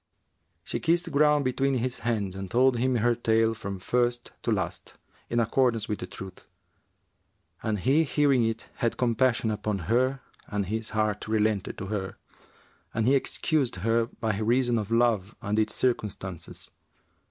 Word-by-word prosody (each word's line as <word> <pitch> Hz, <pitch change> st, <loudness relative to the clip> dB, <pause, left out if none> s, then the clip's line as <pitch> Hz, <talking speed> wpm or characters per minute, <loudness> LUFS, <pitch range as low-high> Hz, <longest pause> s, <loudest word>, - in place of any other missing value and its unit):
She -, -, -3 dB
kissed 170 Hz, +1 st, +1 dB
ground 150 Hz, 0 st, +4 dB
between 135 Hz, +1 st, +1 dB
his 125 Hz, 0 st, -1 dB
hands 110 Hz, -5 st, -1 dB
and 95 Hz, -1 st, -6 dB
told 125 Hz, +3 st, +3 dB
him 130 Hz, +1 st, +2 dB
her 120 Hz, +1 st, +3 dB
tale 115 Hz, -1 st, +2 dB
from 100 Hz, -3 st, -5 dB
first 120 Hz, +5 st, 0 dB
to -, -, -1 dB
last, -, -, -3 dB, 0.3 s
in 120 Hz, -, +1 dB
accordance 115 Hz, -1 st, +2 dB
with 105 Hz, -, -2 dB
the 90 Hz, -, -5 dB
truth; 95 Hz, -1 st, -10 dB, 1.1 s
and 110 Hz, -2 st, -1 dB
he 135 Hz, -, +3 dB
hearing 140 Hz, -4 st, +3 dB
it 115 Hz, 0 st, -2 dB
had 115 Hz, -, 0 dB
compassion 120 Hz, -1 st, +2 dB
upon 105 Hz, -1 st, -2 dB, 0.2 s
her 130 Hz, +2 st, +2 dB, 0.3 s
and 105 Hz, -1 st, -2 dB
his 110 Hz, +3 st, -3 dB
heart 105 Hz, -1 st, 0 dB
relented 110 Hz, -2 st, 0 dB
to 95 Hz, -, -5 dB
her 95 Hz, -2 st, -4 dB, 0.8 s
and 110 Hz, -, +1 dB
he 130 Hz, -, +4 dB
excused 140 Hz, -, +1 dB
her 115 Hz, 0 st, +2 dB
by 110 Hz, -3 st, -1 dB
reason 120 Hz, +1 st, +2 dB
of 105 Hz, -1 st, -4 dB
love 115 Hz, -3 st, +2 dB
and 105 Hz, 0 st, -1 dB
its 110 Hz, 0 st, 0 dB
circumstances. 100 Hz, -7 st, -3 dB
115 Hz, 155 wpm, -27 LUFS, 105-130 Hz, 1.1 s, ground